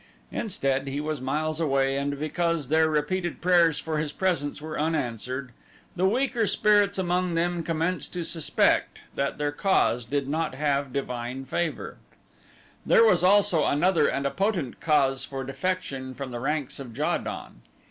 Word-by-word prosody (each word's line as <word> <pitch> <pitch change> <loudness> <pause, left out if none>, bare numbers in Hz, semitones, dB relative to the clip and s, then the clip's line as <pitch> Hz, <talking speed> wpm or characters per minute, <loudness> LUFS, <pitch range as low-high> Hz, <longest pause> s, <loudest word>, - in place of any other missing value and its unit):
Instead, 135 - -1
he 135 +1 -3
was 150 -2 -3
miles 155 +4 -1
away 135 -3 +1
and 140 0 -2
because 160 -1 -1
their 160 +1 +4
repeated 170 +4 -1
prayers 170 -3 +4
for 155 -1 -2
his 150 -1 -2
presence 150 -6 -1
were 155 0 -5
unanswered, 130 -4 -2 0.4
the 185 +1 +2
weaker 240 0 +1
spirits 205 -1 +3
among 180 -1 0
them 175 +1 0
commenced 165 -1 -2
to 175 -1 -3
suspect 165 -2 +1 0.2
that 140 - -2
their 145 0 -1
cause 145 -7 +2
did 135 +3 -2
not 155 -1 -1
have 140 -1 0
divine 125 -1 -4
favor. 165 +4 -3 0.9
There 470 -2 +5
was 455 - +4
also 195 -4 +5
another 165 +2 +3
and 140 0 -1
a 140 - +1
potent 190 - -1
cause 140 -4 +2
for 135 -1 -5
defection 135 -3 -3
from 135 -2 -6
the 120 - -4
ranks 145 +1 -2
of 125 -4 -9
Ja 150 - +1
don. - - -7
150 Hz, 160 wpm, -26 LUFS, 135-175 Hz, 0.9 s, There